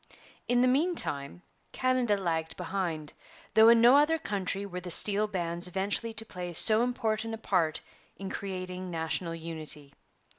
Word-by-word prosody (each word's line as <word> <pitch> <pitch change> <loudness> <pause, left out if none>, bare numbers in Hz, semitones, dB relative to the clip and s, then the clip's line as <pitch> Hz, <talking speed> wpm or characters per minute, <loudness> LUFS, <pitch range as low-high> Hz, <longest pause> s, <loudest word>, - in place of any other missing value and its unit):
In 245 0 +3
the 255 - +4
meantime 180 - -1 0.3
Canada 255 -5 +1
lagged 160 -4 -3
behind, 175 -4 -4 0.4
though 220 +1 +7
in 230 0 +6
no 240 +3 +7
other 300 +3 +3
country 195 - -3
were 180 -2 -6
the 180 - -7
steel 205 +4 +4
bands 175 -3 -1
eventually 200 +5 -1
to 225 0 -4
play 180 -4 -6
so 215 +6 +5
important 225 -2 -1
a - - -10
part 175 -8 0 0.4
in 195 - -6
creating 185 -1 -5
national 165 0 -3
unity. 155 -3 -6
190 Hz, 150 wpm, -29 LUFS, 170-225 Hz, 0.4 s, though